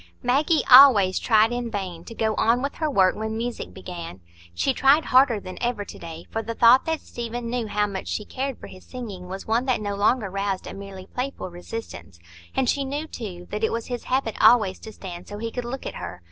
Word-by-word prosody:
Maggie 295 +6 +2
always 250 -8 +8
tried 220 0 +4
in 245 -1 -3
vain 185 -6 -5
to 230 - -9
go 220 -1 0
on 235 +4 +2
with 280 - -2
her 310 -2 0
work 190 -9 +3
when 220 +1 -3
music 235 +1 -4
began. 175 - -8 0.4
She 265 - +1
tried 275 +5 +4
harder 255 -4 +4
than 185 -2 -9
ever 240 -4 -1
to - - -11
day; 165 0 -9
for 225 - -2
the 230 +1 -5
thought 235 +3 +6
that 320 -1 -1
Stephen 235 0 -5
knew 240 -2 -2
how 210 0 +1
much 195 -2 -5
she 210 - -3
cared 270 -1 -4
for - - -10
his 185 - -12
singing 210 -8 -8
was 190 +1 -6
one 230 +3 +1
that 255 -3 +1
no 205 -1 -3
longer 205 0 +1
roused 195 -1 -2
a - - -7
merely 195 -1 -9
playful 250 -7 -5
resistance; 175 - -8 0.4
and 265 - +1
she 280 +3 +1
knew, 285 +3 -3
too, 185 - -8
that 210 +1 -3
it 220 - +2
was 230 +1 -4
his 245 -1 -4
habit 255 -4 0
always 215 -4 +5
to 220 - -9
stand 180 -4 -9
so 205 - -7
that 215 - -8
he 230 - -3
could 245 0 -4
look 255 +3 -6
at - - -4
her. 90 - -7
225 Hz, 230 wpm, -24 LUFS, 195-250 Hz, 0.4 s, always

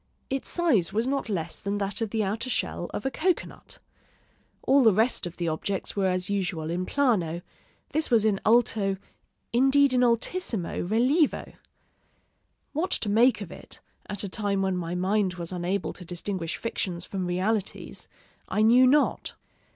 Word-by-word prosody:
Its 270 0 -2
size 275 - +2
was 220 +3 0
not 275 -2 -1
less 170 -5 -3
than 200 +1 -2
that 205 +3 -1
of 225 - -1
the 220 0 0
outer 220 +6 -2
shell - - -2
of - - -5
a 270 - 0
cocoanut. 355 +5 -2 0.9
All 275 +1 +5
the 220 -6 +5
rest 225 -3 +2
of 175 - -10
the 175 - -2
objects 180 +5 -2
were 195 -2 +1
as 185 0 0
usual 180 -6 -2
in 180 +2 -2
plano; 180 - +1 0.5
this 310 +1 -1
was 225 -3 +4
in 205 -3 +1
alto, 215 -4 +3 0.6
indeed 270 +2 +4
in 250 - +3
altissimo 235 - 0
rilievo. 255 - +1 1.2
What 320 +5 -1
to 210 - 0
make 235 +5 +4
of - - -7
it, - - -11 0.3
at 205 -1 -1
a - - -2
time 200 0 -1
when 190 -1 0
my 175 -1 -3
mind 190 +1 +1
was 170 -1 -6
unable 180 +2 -2
to 180 - -11
distinguish 175 0 -4
fictions 180 -6 -3
from 185 -2 -3
realities, 195 +3 -2 0.4
I 215 - +1
knew 245 +3 +6
not. 290 +3 +2
205 Hz, 165 wpm, -27 LUFS, 180-245 Hz, 1.2 s, knew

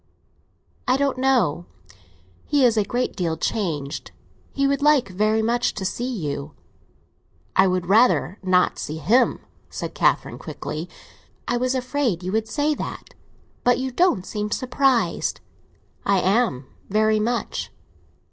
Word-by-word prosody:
"I 255 +1 +3
don't 275 -2 0
know; 225 - +2 0.8
he 285 -3 +3
is 235 -2 +4
a 215 - +3
great 245 +5 -2
deal 165 -4 -1
changed. 150 -10 -2 0.4
He 275 - 0
would 275 0 +1
like 290 -6 +4
very 215 +4 +1
much 240 +2 +1
to 195 - -4
see 240 +6 -2
you." 150 - -4 1.0
"I 190 - +5
would 185 -1 0
rather 190 - +3
not 185 -1 +2
see 155 - -4
him," 210 - +2 0.3
said - - -5
Catherine - - +1
quickly. 155 +4 -6 0.6
"I 240 - +1
was 255 +2 0
afraid 255 - -1
you 185 - -3
would 220 +1 0
say 295 +5 0
that. - - -7 0.5
But 245 0 +4
you 260 0 -3
don't 255 - +2
seem 210 +2 -3
surprised!" 255 +1 +1 0.6
"I 200 0 +2
am—very 215 - +1
much." 235 +3 -2
220 Hz, 135 wpm, -23 LUFS, 185-255 Hz, 1.0 s, I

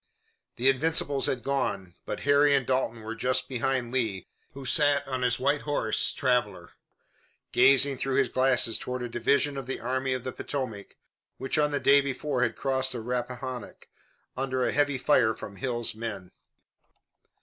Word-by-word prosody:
The 125 +2 0
Invincibles 140 0 +1
had 125 -3 -2
gone, 100 -10 -2
but - - -4
Harry 145 0 +4
and 135 -2 +1
Dalton 130 -3 -1
were 110 +1 -5
just 125 +2 0
behind 130 -1 -2
Lee, 110 -8 -1 0.3
who 135 -1 -8
sat 145 0 +2
on 130 -1 -3
his 125 0 +1
white 140 +3 +1
horse, 145 -7 +1
Traveler, 125 -2 -1 0.8
gazing 140 0 +4
through 135 -1 -1
his 135 -1 +3
glasses 130 -2 +2
toward 125 0 -4
a - - -3
division 140 +4 +1
of 135 -2 -6
the 135 - -3
Army 130 +2 -1
of 130 - -5
the 130 - -4
Potomac 120 -8 -5 0.4
which 135 +3 -1
on 150 -1 +3
the 145 -1 -1
day 140 +1 +5
before 140 -1 -2
had 120 - +1
crossed 130 -1 0
the 120 - -4
Rappahannock, 125 0 -5 0.5
under 130 -1 -1
a - - 0
heavy 145 -2 +1
fire 120 -5 +3
from 100 - -9
Hill's 120 -2 -1
men. 105 -5 -6
130 Hz, 165 wpm, -27 LUFS, 120-140 Hz, 0.8 s, day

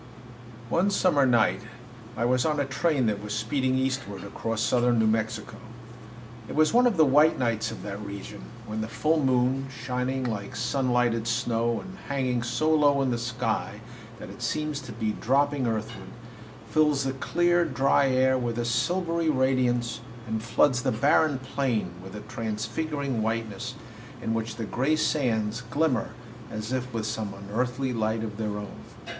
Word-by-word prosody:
One 175 +9 +2
summer 175 -8 +3
night 120 -3 +3 0.6
I 115 - +1
was 125 +1 +2
on 155 -2 +1
a 140 - +1
train 135 0 +1
that 105 -2 0
was 105 0 -4
speeding 130 +4 0
eastward 130 -7 -2
across 115 +2 -4
southern 120 0 +3
New 110 - +3
Mexico. 110 0 -1 0.9
It - - -5
was 155 +4 +4
one 245 +1 +6
of 220 -7 0
the 160 - +6
white 150 +3 +5
nights 115 -4 0
of - - -8
that 100 0 -5
region, 100 +1 -7 0.2
when 110 0 -4
the 110 - -3
full 155 +6 +1
moon, 130 +1 +2
shining 125 +1 -2
like 105 -5 -4
sun 135 -2 0
lighted 120 -2 +1
snow 115 -1 0
and 190 0 -10
hanging 130 -3 0
so 155 +6 0
low 145 -2 +4
in 130 - +1
the 120 - 0
sky 120 +1 -2 0.4
that - - -9
it - - -12
seems 150 -2 -1
to 130 -3 -9
be 110 -1 -1
dropping 140 +3 +1
earthward, 110 -1 -4 0.6
fills 150 -3 +3
the 135 0 -1
clear, 175 +5 +2
dry 135 -2 +2
air 130 0 +3
with 120 -2 -2
a 120 - -1
silvery 165 +7 0
radiance 125 -3 +1 0.2
and 110 -1 -2
floods 125 +3 +2
the - - +1
barren 140 +5 +3
plain 130 -7 -1
with 95 +2 -9
a 105 - -6
transfiguring 120 +5 -3
whiteness, 115 +3 -3 0.4
in 115 -2 -2
which 115 0 -2
the 115 -1 -4
gray 135 +8 +1
sands 120 -7 0
glimmer 145 -6 +1 0.4
as 110 +3 -4
if 130 0 -2
with 115 -2 -3
some 110 -2 -3
unearthly 125 +6 -2
light 110 -1 0
of 105 -2 -5
their 105 -2 -2
own. 105 -1 -8
125 Hz, 170 wpm, -27 LUFS, 110-140 Hz, 0.9 s, one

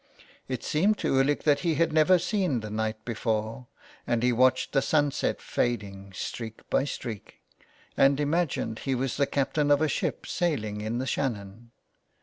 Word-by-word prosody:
It 130 -3 -4
seemed 200 +8 +2
to - - -1
Ulick 135 +2 +2
that 145 -2 +3
he 165 -1 0
had 165 +1 +1
never 160 +4 +5
seen 175 - 0
the 105 -1 -7
night 110 0 -3
before, 115 +1 -2 0.4
and 120 -1 +1
he 125 0 +3
watched 130 +2 +3
the 135 - +3
sunset 145 -1 +1
fading 100 -5 -2
streak 110 +3 -6
by 135 - +3
streak, 115 -7 -6 0.6
and 135 +1 +4
imagined 145 -7 0
he 135 -1 -1
was 130 0 -2
the 140 -1 +2
captain 145 +1 0
of 145 -1 +5
a 155 - +2
ship - - -2
sailing 110 -12 -1
in 110 +2 -2
the 130 - -2
Shannon. 115 -4 -3
130 Hz, 165 wpm, -27 LUFS, 110-145 Hz, 0.6 s, never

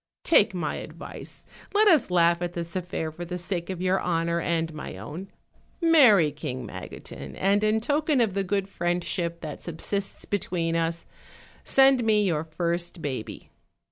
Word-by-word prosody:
Take 210 - +4
my 165 -4 -2
advice; - - -10 0.3
let 425 +1 +5
us 310 - +5
laugh 170 -1 +3
at 175 0 -3
this 170 +1 -5
affair 175 -3 -3
for 170 +3 -7
the 180 +1 -4
sake 175 0 -4
of 185 -1 -4
your 185 +1 +2
honor 170 -1 0
and 165 -1 -1
my 150 -10 -7
own; 150 - -7 0.5
marry 255 - +6
King 130 -3 -5
Magotin, - - -9
and 200 +2 +2
in 215 +1 +3
token 295 +4 +1
of 225 -5 +2
the 195 0 0
good 195 0 -1
friendship 175 -2 -2
that 155 -2 -7
subsists 195 +4 -3
between 175 -4 -1
us, 165 0 -1 0.6
send 270 -2 +5
me 215 -2 +3
your 165 -6 0
first 170 +2 -2
baby." 130 -6 -5
175 Hz, 160 wpm, -26 LUFS, 165-205 Hz, 0.6 s, marry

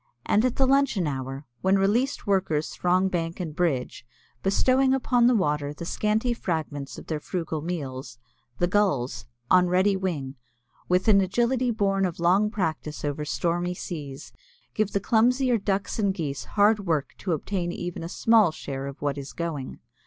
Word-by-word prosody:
And 210 - +3
at 255 -2 +1
the 270 - +3
luncheon 270 -8 +2
hour, 135 0 -4 0.2
when 190 +1 +3
released 225 +8 +1
workers 185 -7 0
throng 180 +2 +2
bank 170 -2 -3
and 160 -4 -5
bridge, 150 -11 -1 0.4
bestowing 260 +7 +3
upon 245 -2 +3
the 250 - +4
water 150 -6 0
the 170 - -7
scanty 215 +6 0
fragments 155 -9 -4
of - - -9
their 155 -2 -3
frugal 160 -1 -4
meals, 135 -7 -5 0.4
the 175 - +2
gulls, 140 - 0 0.2
on 180 0 +6
ready 190 +3 +3
wing, 150 -8 -3 0.5
with 180 +4 +2
an 200 -2 +6
agility 240 +6 +1
born 195 -3 +1
of 170 - -7
long 185 +5 +3
practice 155 -7 -3
over 145 +1 -2
stormy 175 +3 -1
seas, 145 -6 -7 0.4
give 215 -1 0
the 200 - +2
clumsier 245 +3 +2
Ducks 200 +2 -2
and 200 -2 +2
Geese 150 -7 -4
hard 210 +1 +3
work 150 -4 0
to 180 - -1
obtain 175 +3 -2
even 175 -1 -5
a 165 - -5
small 220 -3 +4
share 135 -3 -6
of 140 +1 -8
what 145 -1 -1
is 135 0 -8
going. 160 -6 -4
180 Hz, 165 wpm, -26 LUFS, 150-210 Hz, 0.5 s, on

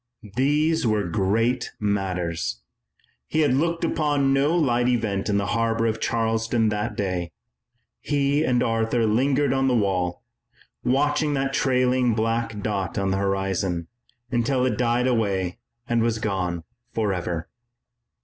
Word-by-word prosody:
These 150 +3 +2
were 105 -2 +1
great 110 +7 0
matters. 90 - -2 0.7
He 160 - +1
had 145 -4 +3
looked 165 +5 0
upon 145 -4 +1
no 140 +5 +2
light 120 -6 +2
event 110 -5 0
in 100 - +2
the 100 - 0
harbor 115 0 +1
of 115 -1 0
Charleston 115 0 +1
that 105 0 -2
day. 90 -4 -2 0.7
He 145 0 +1
and 125 -5 +2
Arthur 115 +1 +1
lingered 135 +5 +2
on 135 0 +1
the 125 - +2
wall, 95 -5 0 0.6
watching 145 +3 +1
that 135 0 -1
trailing 125 -3 +2
black 115 -1 -1
dot 100 -3 -2
on 95 -1 0
the 95 - +1
horizon, 95 -3 -1 0.4
until 125 +1 +1
it 125 -4 +1
died 120 +1 +1
away 100 -5 0 0.3
and 120 -1 +1
was 115 -1 +1
gone 90 -5 -2 0.3
forever. 90 -6 -2
115 Hz, 135 wpm, -24 LUFS, 100-130 Hz, 0.7 s, had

